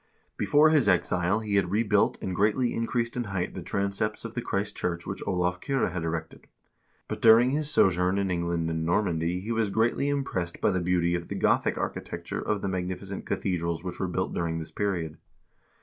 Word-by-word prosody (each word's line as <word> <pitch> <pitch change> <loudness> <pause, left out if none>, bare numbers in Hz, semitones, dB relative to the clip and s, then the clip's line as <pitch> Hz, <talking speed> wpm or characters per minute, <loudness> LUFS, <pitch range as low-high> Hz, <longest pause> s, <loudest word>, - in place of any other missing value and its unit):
Before 155 +2 +4
his 145 -9 +4
exile 90 +2 +2
he 105 -2 0
had 95 -3 +2
rebuilt 105 0 +2
and 95 - -2
greatly 110 +5 +2
increased 115 0 -1
in 120 -1 -2
height 95 -3 -3
the 95 - -6
transepts 100 +5 -2
of 115 - -6
the 120 - -2
Christ 105 -1 -2
church 85 -1 -2
which 95 - -5
Olav 90 -2 0
Kyrre 135 -8 0
had 90 -1 -3
erected; 80 0 -5 0.6
but - - -5
during 115 +3 +7
his 150 +1 0
sojourn 90 - +3
in 100 -2 0
England 85 -1 -1
and 80 0 -2
Normandy 85 0 0
he 110 +4 -4
was 115 -2 +1
greatly 115 +7 +1
impressed 95 -12 -2
by - - +2
the 95 -1 0
beauty 85 -1 +1
of 85 -1 -2
the - - -5
Gothic - - +2
architecture - - -4
of 105 -2 -2
the - - 0
magnificent 95 +1 -4
cathedrals 85 -3 -1
which 90 -1 -6
were 95 - 0
built 95 +1 -2
during 85 -1 -1
this 80 -1 -6
period. 85 -6 -2
95 Hz, 195 wpm, -27 LUFS, 85-110 Hz, 0.6 s, during